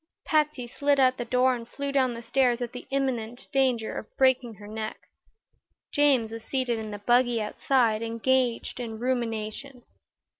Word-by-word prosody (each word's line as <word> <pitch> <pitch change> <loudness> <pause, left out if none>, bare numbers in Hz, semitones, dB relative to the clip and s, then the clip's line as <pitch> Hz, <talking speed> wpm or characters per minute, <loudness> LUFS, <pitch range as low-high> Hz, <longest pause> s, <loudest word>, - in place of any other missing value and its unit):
Patsy 300 -5 +1
slid 285 +3 +1
out 255 -1 +4
the 240 - -3
door 255 +1 +3
and 235 -1 -9
flew 280 0 -3
down 260 -3 +2
the 230 - -8
stairs 250 -1 +2
at 240 -2 -4
the 250 - -8
imminent 245 -4 -2
danger 255 -5 +1
of - - -11
breaking 260 -3 +3
her 205 0 -12
neck. 215 0 -5 0.9
James 270 -6 +3
was 225 0 -7
seated 255 -4 -1
in 220 -1 -5
the 205 - -5
buggy 240 +2 +3
outside, 220 +1 +1
engaged 235 +2 0
in 225 -2 -5
rumination. 240 +1 -3
245 Hz, 160 wpm, -27 LUFS, 225-260 Hz, 0.9 s, out